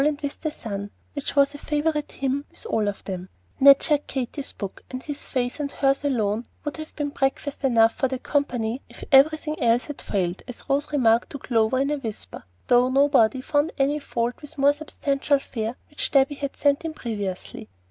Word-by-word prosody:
and 295 0 +1
with 285 0 -4
the 310 - -1
sun," 205 -7 -6 0.2
which 285 0 -4
was 280 0 +4
a 290 - -9
favorite 300 0 -1
hymn 275 +1 -1
with - - -14
all 220 - 0
of 205 - -3
them. 185 -1 -5 0.3
Ned 275 0 +8
shared 295 -1 +1
Katy's 265 +2 -3
book, 200 -2 -7
and 255 0 -6
his 290 -1 -5
face 250 +1 -2
and 285 -1 -2
hers 275 0 +1
alone 230 -5 0 0.2
would 295 - -3
have 310 0 -8
been 295 -1 -2
breakfast 280 +1 -2
enough 230 -4 +5
for 265 - 0
the 260 0 -3
company 250 -3 -1
if - - -12
everything 305 +3 +4
else 235 +1 +3
had 295 - -7
failed, 180 -2 -1
as 250 - -9
Rose 285 +2 0
remarked 235 -5 +3
to - - -6
Clover 230 -2 +1
in 275 +2 +1
a 295 - -1
whisper, 225 -5 -7 0.2
though 245 +1 +4
nobody 265 -3 +4
found 290 +4 +1
any 285 +2 +2
fault 240 -3 -2
with 295 +1 -9
the 280 - -4
more 285 +1 +6
substantial 285 -1 0
fare 230 -3 -4 0.2
which 295 - -3
Debby 275 0 +4
had 280 -1 -5
sent 285 +2 +2
in 320 -1 -4
previously. 205 - -5
275 Hz, 200 wpm, -24 LUFS, 235-290 Hz, 0.3 s, Ned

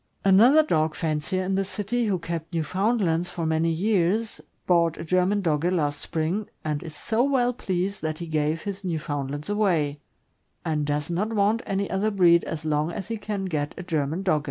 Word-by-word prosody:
Another 235 +11 +7
dog 155 - +1
fancier 160 +4 -1
in 190 +1 -1
this 195 0 0
city, 230 +4 -1
who 195 -3 +1
kept 165 0 -5
Newfound 195 - +1
lands 170 -1 +1
for 170 -2 -4
many 160 +1 +1
years, 200 +4 0 0.2
bought 170 -2 +3
a - - -5
German 185 +4 +2
Dogge 165 +1 +1
last 145 -5 0
spring, 170 +7 -2 0.2
and 150 -1 -1
is 160 -2 -9
so 225 +8 0
well 255 -3 +2
pleased 190 -3 -2
that 155 -1 -2
he 170 - -5
gave 155 0 -1
his 200 -1 -5
Newfoundlands 145 -4 -3
away, 175 -9 +1 0.7
and 150 -2 0
does 145 +2 -1
not 210 +6 -1
want 210 +2 +2
any 195 0 -1
other 195 +3 0
breed 175 -4 +5
as 160 -1 -5
long 155 +1 0
as 190 +3 -6
he 225 - -2
can 205 -2 -4
get 150 -5 -2
a 180 - -5
German 160 0 -1
Dogge. 180 -6 +2
175 Hz, 190 wpm, -25 LUFS, 155-200 Hz, 0.7 s, Another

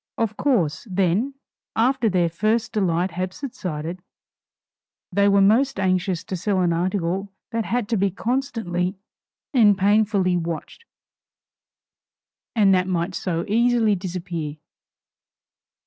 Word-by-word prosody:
Of 225 -2 -1
course, 180 - 0
then, 195 +8 +1 0.4
after 245 0 +2
their 180 -3 +2
first 215 +7 0
delight 185 -4 0
had 185 +2 -3
subsided, 180 - -5 1.1
they 200 +2 +3
were 200 0 +4
most 240 +4 +3
anxious 185 -1 0
to 190 - -5
sell 190 +2 0
an 175 -2 +2
article 185 +2 -1 0.2
that 225 -1 -1
had 240 -3 -1
to 230 - +1
be 200 +1 +2
constantly 215 -5 -2 0.6
and 210 -6 +5
painfully 200 -2 +3
watched, 170 - -5 1.7
and 200 -4 +5
that 185 0 +2
might 180 0 -1
so 170 -3 -2
easily 230 0 +3
disappear. 175 -5 -4
195 Hz, 115 wpm, -23 LUFS, 175-220 Hz, 1.7 s, and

